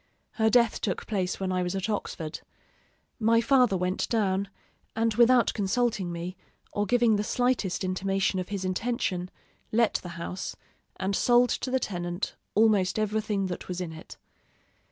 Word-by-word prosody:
Her 220 -1 +2
death 235 0 +3
took 190 - -2
place 190 -4 -2
when 190 -1 -1
I 185 0 0
was 180 +1 -2
at 190 +1 -2
Oxford. 170 -7 -4 0.8
My 230 +1 +4
father 245 -4 +4
went 180 +1 -1
down; 200 -3 +1 0.5
and 225 0 +1
without 240 +2 +5
consulting 205 -2 0
me, 170 +2 -5 0.4
or 205 0 0
giving 240 -3 +4
the 205 - 0
slightest 245 -6 0
intimation 195 +1 0
of 180 - -4
his 200 -2 -3
intention, 185 -2 -1 0.4
let 230 0 +3
the 175 - -8
house, 180 +2 -5 0.4
and 190 +1 -1
sold 245 +2 +4
to - - -2
the 260 +1 +1
tenant 175 -4 -3 0.2
almost 205 -3 +3
everything 215 -2 0
that 180 -1 -5
was 180 -1 -4
in 175 -3 -4
it. 160 0 -11
200 Hz, 155 wpm, -27 LUFS, 185-230 Hz, 0.8 s, without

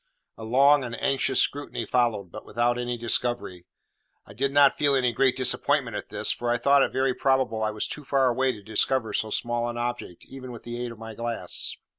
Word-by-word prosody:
A 115 - -11
long 135 +5 +4
and 120 -2 -6
anxious 135 -1 +1
scrutiny 145 +1 -1
followed, 115 -7 0
but 110 - -9
without 120 +2 0
any 120 0 -3
discovery. 120 -6 -2 0.6
I 100 - -14
did 135 +6 -1
not 140 -1 +5
feel 145 -2 +2
any 125 -2 +2
very - - -5
great 130 +1 +2
disappointment 130 -1 +1
at - - -6
this, - - +1
for 120 - -3
I 120 - +2
thought 140 +3 +4
it - - +1
very 130 0 +1
probable 130 -4 0
I 110 - +1
was 105 0 -2
too 150 - -5
far 135 -1 +2
away 130 +2 +1
to 105 -4 -11
discover 110 +3 0
so 110 - -1
small 120 +2 -2
an 120 - -6
object, 120 -7 -5
even 130 -2 -9
with 115 - -10
the 120 +1 -5
aid 120 - -5
of 115 - -11
my 110 0 -9
glass. 115 +1 -3
120 Hz, 220 wpm, -25 LUFS, 115-130 Hz, 0.6 s, not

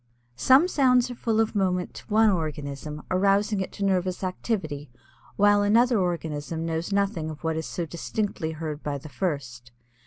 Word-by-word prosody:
Some 270 +7 +6
sounds 250 -6 +3
are - - -4
full 225 -2 -1
of 225 -1 +1
moment 185 -3 0
to - - -11
one 220 0 +4
organism 150 -3 -4
arousing 200 +2 +2
it 190 - -4
to 200 - -2
nervous 185 -1 0
activity 175 -6 -3 0.5
while 205 0 +4
another 230 +3 +4
organism 165 -3 -2
knows 165 +3 -2
nothing 195 -5 0
of 155 0 -9
what 160 0 0
is 160 0 -3
so 175 - -3
distinctly 170 0 -3
heard 155 -1 -5
by 145 -1 -3
the 145 +3 -10
first. 130 -9 -4
180 Hz, 165 wpm, -26 LUFS, 155-205 Hz, 0.5 s, Some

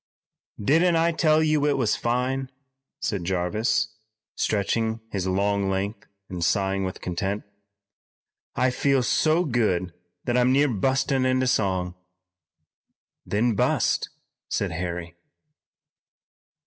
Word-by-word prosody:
"Didn't 165 - +3
I 165 +1 +3
tell 155 -1 +3
you 155 -2 +2
it 145 -2 +2
was 120 -5 +1
fine?" 125 +2 -1 0.5
said 100 -4 -2
Jarvis, 95 +5 0 0.4
stretching 110 +2 0
his 95 -2 -2
long 100 +1 +1
length 100 +3 -3 0.2
and 90 -2 -4
sighing 95 +1 +1
with 95 - -5
content. 95 +3 -2 1.1
"I 130 0 +2
feel 135 0 +2
so 155 +7 +2
good 105 - 0 0.3
that 120 - -1
I'm 125 +1 +4
near 140 +2 +4
bustin' 130 +4 +1
into 130 0 +2
song." 95 -7 0 1.3
"Then 115 +3 +1
bust," 100 - +1 0.4
said - - -1
Harry. 85 0 -4
110 Hz, 110 wpm, -25 LUFS, 95-135 Hz, 1.3 s, I'm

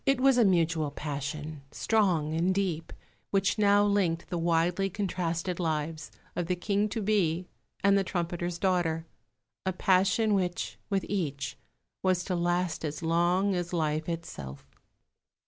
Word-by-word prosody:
It 270 -2 +2
was 265 -1 +5
a - - +7
mutual 165 -5 +2
passion, 150 +1 -5
strong 175 -7 +1
and 175 +4 +1
deep, 175 -5 -1 0.4
which 200 +2 +1
now 205 0 +5
linked 185 -5 +1
the 175 - 0
widely 170 +3 +2
contrasted 180 -3 -2
lives 155 -2 -2 0.3
of 175 -2 -2
the 180 - +1
King 200 +3 0
to 215 +1 -3
be 185 -4 +1 0.4
and 200 0 +5
the 195 - +3
trumpeter's 175 -1 -2
daughter 170 -3 +1 0.6
a 190 - 0
passion 195 +3 +3
which, 180 -3 -1
with 195 -2 0
each, 140 -9 -2 0.5
was 185 -1 +2
to 180 - -2
last 175 0 0
as 155 +1 -4
long 175 +4 +2
as 175 -1 -2
life 155 -1 0
itself. 75 - -6
175 Hz, 145 wpm, -29 LUFS, 165-195 Hz, 0.6 s, a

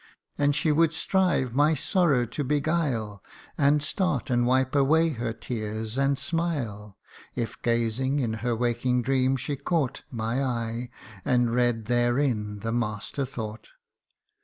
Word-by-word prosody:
And 145 0 +2
she 155 - +2
would 165 +1 +3
strive 180 -10 +1
my 150 +4 +4
sorrow 150 -4 +2
to 145 +5 -4
beguile, 140 - -1 0.3
And 145 +1 +3
start, 155 -6 -1
and 120 0 +2
wipe 130 +1 +2
away 155 +4 +4
her 120 -5 -3
tears, 110 -1 -4
and 135 0 +2
smile, 125 - -3 0.4
If, 120 -2 -4
gazing 120 +4 0
in 120 -6 0
her 120 -1 0
waking 120 +1 0
dream, 130 +1 +2
she 140 +3 -3
caught 140 -1 -1
My 115 +2 -1
eye, 120 -1 -2 0.3
and 125 -4 +2
read 120 -2 +1
therein 120 -3 0
the 115 - -2
master 115 +3 -2
thought. 110 -4 -7
125 Hz, 135 wpm, -26 LUFS, 115-145 Hz, 0.4 s, my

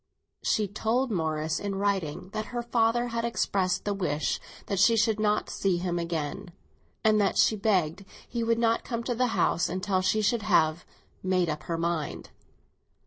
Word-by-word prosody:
She 210 -1 +1
told 225 +5 0
Morris 160 -3 -1
in 200 -1 -3
writing 195 -4 -1
that 215 +1 -4
her 240 +1 -4
father 235 0 +1
had 230 0 -2
expressed 195 -5 0
the 205 - 0
wish 155 -6 -1 0.3
that 200 - -2
she 225 +3 +5
should 220 -1 +2
not 210 0 +1
see 190 -3 0
him 175 -1 -1
again, 170 +3 -3 0.5
and 215 -1 +4
that 200 - +1
she 220 - +4
begged 195 -4 +1 0.2
he 235 -1 -2
would 230 0 +2
not 230 -1 +2
come 235 -2 -3
to 245 - -1
the 250 +2 +1
house 170 - +2
until 185 +1 0
she 215 +3 +1
should 220 +2 +2
have 165 -5 +2 0.4
"made 185 -2 +1
up 150 0 -3
her 165 - 0
mind." 165 -2 -3
200 Hz, 175 wpm, -28 LUFS, 175-225 Hz, 0.5 s, she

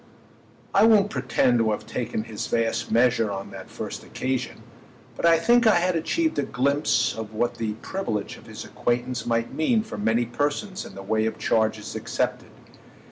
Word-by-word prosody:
I 200 - +5
won't 210 -2 +5
pretend 125 -1 +2
to 115 -1 +2
have 105 - -2
taken 115 -3 -3
his 110 -2 -5
vast 115 0 0
measure 115 -1 +3
on 100 -1 -5
that - - -9
first - - -6
occasion, 130 -1 -3 0.5
but - - +1
I 165 -1 +6
think 235 +7 +4
I 220 - +6
had 175 +1 +2
achieved 320 - 0
a - - +3
glimpse 125 -3 +1
of 110 -1 -7
what 120 +2 -1
the 110 -2 -1
privilege 110 - -3
of - - -15
his - - -8
acquaintance 120 +1 -2
might 115 0 0
mean 215 +8 +2
for 215 - -7
many 110 +3 +2
persons 145 - -2
in - - -13
the 95 - -8
way 110 +2 +1
of 110 - -3
charges 110 -1 0
accepted. - - -2
120 Hz, 180 wpm, -25 LUFS, 110-165 Hz, 0.5 s, I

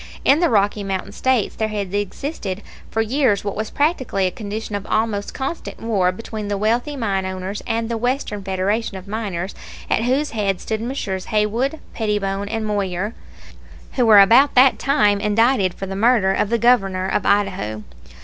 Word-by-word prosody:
In 280 +3 +5
the 345 - +3
Rocky 205 -1 +2
Mountain 195 0 -3
States 255 0 0
there 220 - -1
had 205 -3 -4
existed 205 - -3 0.3
for 225 - 0
years 240 -3 +1
what 200 - -3
was 215 +1 -3
practically 270 - 0
a 185 - 0
condition 215 +2 -6
of 200 0 -4
almost 215 -2 -1
constant 270 +5 -5
war 200 -5 +1
between 215 +1 -6
the 205 0 -1
wealthy 235 +8 0
mine 200 -7 -1
owners 190 +2 -4
and 225 0 -1
the 230 -1 -3
Western 245 -4 -2
Federation 195 +3 -1
of 190 +1 -11
Miners, 200 -4 -3 0.4
at 225 - +2
whose 275 +4 +1
head 200 -4 -1
stood 220 -1 -3
Messrs. 225 -7 -3
Haywood, 230 +8 0
Pettibone, 205 -2 -1
and 225 0 -2
Moyer, 200 0 -2 0.8
who 245 -3 +1
were 210 -2 +9
about 240 +8 +6
that 255 +1 +6
time 210 -8 +3
indicted 210 -2 +2
for 195 - -5
the 195 0 -5
murder 210 -2 +3
of 205 - 0
the 235 - +2
Governor 195 -6 +2
of 195 - 0
Idaho. 185 - 0
210 Hz, 175 wpm, -21 LUFS, 195-235 Hz, 0.8 s, were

